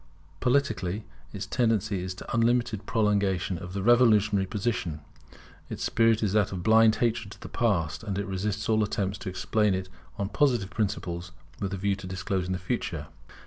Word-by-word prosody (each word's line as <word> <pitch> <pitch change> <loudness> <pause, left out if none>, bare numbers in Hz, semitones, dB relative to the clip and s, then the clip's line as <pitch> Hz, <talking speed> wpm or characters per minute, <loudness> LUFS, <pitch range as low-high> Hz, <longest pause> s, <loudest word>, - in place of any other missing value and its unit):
Politically, 115 - 0 0.3
its 100 - -5
tendency 110 -5 +1
is 90 0 -4
to - - -8
unlimited 115 -2 +1
prolongation 100 -4 +1
of 90 -1 -8
the 100 -1 -3
revolutionary 110 -4 +4
position: 95 -7 -2 0.7
its - - -5
spirit 115 -1 +3
is 100 -2 +1
that 105 -2 +2
of 90 -2 -4
blind 110 +2 +6
hatred 115 -2 0
to - - -17
the - - -8
past: 100 -11 0
and 100 -3 -3
it 100 - -1
resists 100 +1 -2
all 110 -1 +3
attempts 100 -1 -2
to 115 -6 -5
explain 105 +2 +1
it 95 0 -4 0.3
on 100 - -1
Positive 120 -6 +1
principles, 90 -5 -3 0.3
with 100 -1 -2
a 95 - -3
view 100 +2 0
of 95 -1 -6
disclosing 95 -1 -2
the - - -1
future. 90 -1 -3
100 Hz, 175 wpm, -27 LUFS, 95-110 Hz, 0.7 s, blind